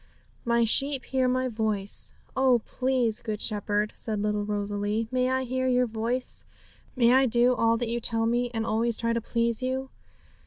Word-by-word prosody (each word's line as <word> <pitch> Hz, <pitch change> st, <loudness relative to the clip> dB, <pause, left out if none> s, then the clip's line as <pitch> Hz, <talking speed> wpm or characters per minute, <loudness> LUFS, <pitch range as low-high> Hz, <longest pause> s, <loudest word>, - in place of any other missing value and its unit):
'"My 235 Hz, 0 st, +2 dB
sheep 275 Hz, +4 st, +4 dB
hear 260 Hz, -1 st, 0 dB
My 255 Hz, +1 st, 0 dB
voice." 215 Hz, -4 st, -1 dB, 0.2 s
Oh, 260 Hz, -3 st, +3 dB
please 250 Hz, -4 st, 0 dB
Good 215 Hz, -1 st, -5 dB
Shepherd, 210 Hz, -1 st, -1 dB
said 215 Hz, -2 st, -3 dB
little 210 Hz, 0 st, -1 dB
Rosalie, 205 Hz, +1 st, -2 dB
'may 255 Hz, 0 st, +1 dB
I 260 Hz, 0 st, 0 dB
hear 260 Hz, +1 st, -2 dB
your 250 Hz, 0 st, +2 dB
voice; 235 Hz, +3 st, -1 dB, 0.5 s
may 240 Hz, -1 st, +4 dB
I 265 Hz, 0 st, +4 dB
do 240 Hz, +1 st, +3 dB
all 230 Hz, -1 st, +2 dB
that 240 Hz, 0 st, -3 dB
you 235 Hz, +1 st, -2 dB
tell 225 Hz, -1 st, -1 dB
me, 240 Hz, +1 st, 0 dB
and 225 Hz, -2 st, -3 dB
always 230 Hz, +1 st, 0 dB
try 230 Hz, 0 st, -1 dB
to 230 Hz, -, -1 dB
please 235 Hz, 0 st, -1 dB
you! 260 Hz, +1 st, -3 dB
235 Hz, 180 wpm, -26 LUFS, 220-255 Hz, 0.5 s, sheep